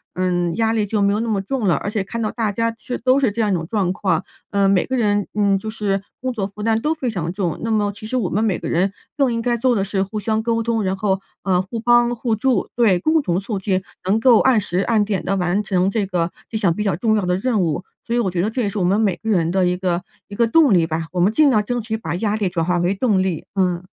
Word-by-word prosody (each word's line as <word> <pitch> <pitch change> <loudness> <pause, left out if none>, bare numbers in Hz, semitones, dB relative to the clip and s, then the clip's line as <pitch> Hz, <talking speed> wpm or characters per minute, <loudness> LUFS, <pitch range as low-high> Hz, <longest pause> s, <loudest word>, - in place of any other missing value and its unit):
嗯， 175 -2 0
压 225 +1 +1
力 215 -2 +1
就 210 0 0
没 200 0 +3
有 210 - 0
那 230 - -2
么 210 -3 +1
重 230 +1 -2
了， 170 - +4
而 140 - -4
且 210 -1 -1
看 230 +4 -6
到 215 - -1
大 225 -3 -1
家 230 +3 -1
是 250 - -4
都 255 +3 +3
是 265 -4 +2
这 225 +3 -2
样 210 - +1
一 - - +2
种 165 -3 -2
状 190 -3 0
况， 185 -3 0 0.3
嗯， 200 -1 +3
每 190 -2 +2
个 260 - -1
人 205 -3 +1
嗯， 200 -2 +3
就 220 - -6
是 205 -3 -1 0.2
工 255 0 -3
作 200 -5 -2
负 210 +1 -9
担 225 0 +1
都 305 +5 +1
非 265 -5 -2
常 170 -5 -3
重。 180 -4 -2
那 230 - -2
么 210 -2 +1
其 215 0 -9
实 255 - -1
我 205 -8 0
们 215 - +1
每 205 -5 +1
个 - - -6
人 185 +3 +1 0.2
更 275 -4 +2
应 230 - -1
该 240 0 +1
做 245 +1 +2
的 195 -2 0
是 195 -1 -1
互 200 +2 -5
相 220 +1 0
沟 230 0 0
通， 225 -1 0
然 190 0 -1
后， 195 -1 0 0.2
呃， 185 -2 +2
互 210 +5 -6
帮 240 +1 +3
互 230 -1 -1
助， 235 -1 0
对， 225 -7 +4
共 315 - +2
同 180 -8 0
促 200 0 -4
进 190 -1 -1 0.2
能 200 +4 +2
够 235 -1 +6
按 260 -4 +4
时 185 -3 -2
按 215 +1 +2
点 200 -2 -2
地 195 - 0
完 180 +2 0
成 190 -1 +1
这 210 -1 0
个 175 -2 -1 0.2
这 220 - -3
项 195 -6 +2
比 210 - -3
较 195 -5 0
重 215 +5 +1
要 210 - +1
的 180 0 +1
任 220 0 0
务， 170 +1 -1 0.2
所 235 - -1
以 - - +2
我 215 -5 +1
觉 175 -1 -1
得 205 - 0
这 250 +3 -2
也 205 - 0
是 210 - -6
我 - - +1
们 190 +4 +2
每 200 -5 +2
个 225 - -5
人 170 -5 +2
的 190 0 +2
一 180 - +1
个 180 -1 -1 0.2
一 - - -12
个 235 - +3
动 285 0 +5
力 170 -3 +4
吧， 160 0 -3
我 180 - -2
们 185 +4 +4
尽 300 +3 +5
量 215 -4 +3
争 245 +3 -2
取 220 0 -3
把 220 - -4
压 210 +3 0
力 205 -4 0
转 170 -2 -1
化 180 +1 +1
为 175 +2 +1
动 205 -3 +2
力， 185 -4 -2
嗯。 180 -2 0
205 Hz, 320 characters per minute, -20 LUFS, 185-230 Hz, 0.3 s, 够